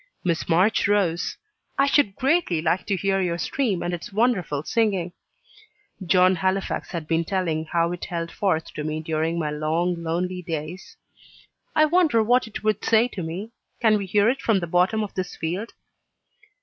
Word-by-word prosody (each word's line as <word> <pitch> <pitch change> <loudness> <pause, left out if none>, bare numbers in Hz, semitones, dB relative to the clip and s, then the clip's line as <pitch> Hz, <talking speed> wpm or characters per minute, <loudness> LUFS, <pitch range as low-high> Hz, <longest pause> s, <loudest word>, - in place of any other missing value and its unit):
Miss 170 -3 -1
March 185 +7 +3
rose. 190 -5 +1 0.4
"I 275 - +4
should 280 -8 +2
greatly 275 - +1
like 165 +3 0
to 200 - +1
hear 195 +1 0
your 170 -2 -1
stream 195 - -1
and 175 - -2
its 175 +3 -6
wonderful 195 - 0
singing." 190 -2 0 0.9
(John 185 +1 +4
Halifax 190 +3 -1
had 165 -4 -5
been 165 0 +1
telling 165 -3 -1
how 170 +1 0
it 175 - -5
held 170 -1 -4
forth 165 -5 -1
to 150 - -5
me 155 +1 -2
during 160 +1 -1
my 155 -3 -1
long, 165 +3 -1
lonely 180 +2 -2
days) 165 +1 -6 0.8
"I 310 - +6
wonder 310 -8 +3
what 245 +2 +3
it 220 - -8
would 215 -1 0
say 230 +2 +3
to 195 - -6
me? 180 +7 -5 0.3
Can 215 -3 +4
we 195 - -5
hear 205 +3 +3
it 255 +4 +1
from 220 -4 +2
the 175 - -3
bottom 180 +6 +2
of 205 - -6
this 185 -1 -4
field?" 180 +8 -3
180 Hz, 175 wpm, -24 LUFS, 165-215 Hz, 0.9 s, I